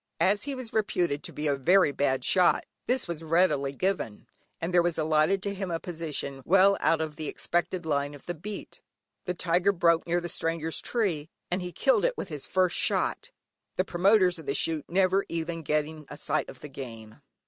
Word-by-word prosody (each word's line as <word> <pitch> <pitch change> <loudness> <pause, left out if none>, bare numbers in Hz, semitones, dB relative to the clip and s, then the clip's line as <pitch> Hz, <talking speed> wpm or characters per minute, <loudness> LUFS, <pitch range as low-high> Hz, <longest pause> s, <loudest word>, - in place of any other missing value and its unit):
As 205 +3 +2
he 280 -1 -3
was 255 -3 -8
reputed 175 -9 0
to - - -7
be 150 - -5
a 145 -2 +2
very 175 +5 +4
bad 135 -2 0
shot 180 +4 +3 0.2
this 255 -4 0
was 170 -2 -4
readily 155 -4 +2
given, 140 - -2 0.3
and 170 +2 -3
there 175 - +6
was 170 -1 0
allotted 155 +5 +2
to 200 - -2
him 195 -1 -4
a 165 -1 -1
position 155 -6 -4
well 195 +5 +5
out 165 - +2
of 155 -2 -4
the 155 -2 -4
expected 175 0 -2
line 145 -1 -1
of 145 - -15
the 175 - -3
beat. 195 +5 -8 0.4
The 180 -1 -2
tiger 175 +3 +2
broke 170 -3 +2
near 175 +1 +2
the 175 - -5
stranger's 165 -1 -2
tree, 175 -10 -1 0.2
and 180 +1 0
he 180 0 -5
killed - - +2
it - - +1
with - - -5
his 150 -4 -5
first 185 -2 +2
shot, - - 0 0.5
the 185 - +1
promoters 185 -1 +3
of 160 - -11
the 140 - 0
shoot 160 -3 0
never 190 +2 +3
even 165 0 -3
getting 150 0 -2
a - - -8
sight 155 +1 -1
of - - -12
the 150 - -8
game. 115 -5 -9
170 Hz, 205 wpm, -28 LUFS, 150-185 Hz, 0.5 s, there